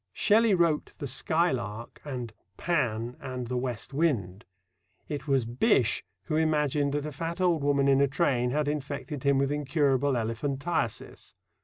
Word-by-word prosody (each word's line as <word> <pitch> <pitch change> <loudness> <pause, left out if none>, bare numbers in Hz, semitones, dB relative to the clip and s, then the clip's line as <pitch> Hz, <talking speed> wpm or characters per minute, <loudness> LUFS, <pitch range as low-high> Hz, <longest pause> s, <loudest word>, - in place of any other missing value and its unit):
Shelley 215 -1 +4
wrote 170 -4 +1
The - - -5
Skylark 125 - -1
and 125 -6 -5 0.2
Pan 125 -8 -1
and 130 -1 -5
The 125 +2 -4
West 125 0 -3
Wind. 115 - 0 0.6
It 150 0 -5
was 135 -4 +2
Bysshe 125 - +2 0.2
who 155 - -3
imagined 150 -3 +1
that 145 0 -1
a 150 - -4
fat 165 +4 -4
old 175 -5 +2
woman 140 -1 +2
in 135 0 +4
a 140 - +4
train 125 -2 +1
had 150 +3 0
infected 145 0 -4
him 140 0 +3
with 135 +1 +1
incurable 145 -2 +1
elephantiasis. 120 +3 -3
140 Hz, 150 wpm, -28 LUFS, 125-150 Hz, 0.6 s, Shelley